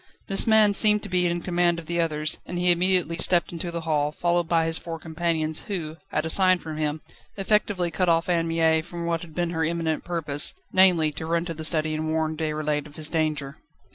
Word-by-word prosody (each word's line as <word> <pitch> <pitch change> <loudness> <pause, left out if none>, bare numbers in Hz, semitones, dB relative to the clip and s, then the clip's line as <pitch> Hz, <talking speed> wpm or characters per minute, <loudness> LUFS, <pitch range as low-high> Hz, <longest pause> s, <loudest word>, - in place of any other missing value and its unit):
This 195 +3 +3
man 215 -2 +5
seemed 210 +1 +3
to - - -5
be 180 -1 +2
in 175 0 -2
command 175 -1 +1
of 170 - -8
the 170 +1 -1
others, 155 -1 -1
and 175 - -5
he 180 0 +3
immediately 175 -1 +1
stepped 175 0 +3
into 170 0 -5
the 170 0 -4
hall, 150 -2 0
followed 175 +1 -1
by 165 -1 +2
his 165 0 0
four 165 -1 -6
companions, 160 -1 -2
who 165 -6 -5
at 160 - -1
a - - -3
sign 185 0 +5
from 160 -3 -8
him, 155 0 -2 0.3
effectively 195 -3 0
cut 180 0 0
off 165 +1 +2
Anne 170 -2 +1
Mie 160 -1 +2
from 170 +1 -7
what 165 -1 -1
had 160 -3 -12
been 175 -1 -1
her 160 -1 -1
imminent 160 -1 -1
purpose 150 -5 0 0.2
namely, 180 -5 +4
to 155 +2 -7
run 170 +1 0
to 170 - -4
the 160 0 -8
study 155 -1 0
and 155 0 -3
warn 160 0 -1
Déroulède 150 -2 -2
of 150 - -17
his 155 -1 -3
danger. 155 -3 -2
165 Hz, 225 wpm, -24 LUFS, 155-175 Hz, 0.3 s, man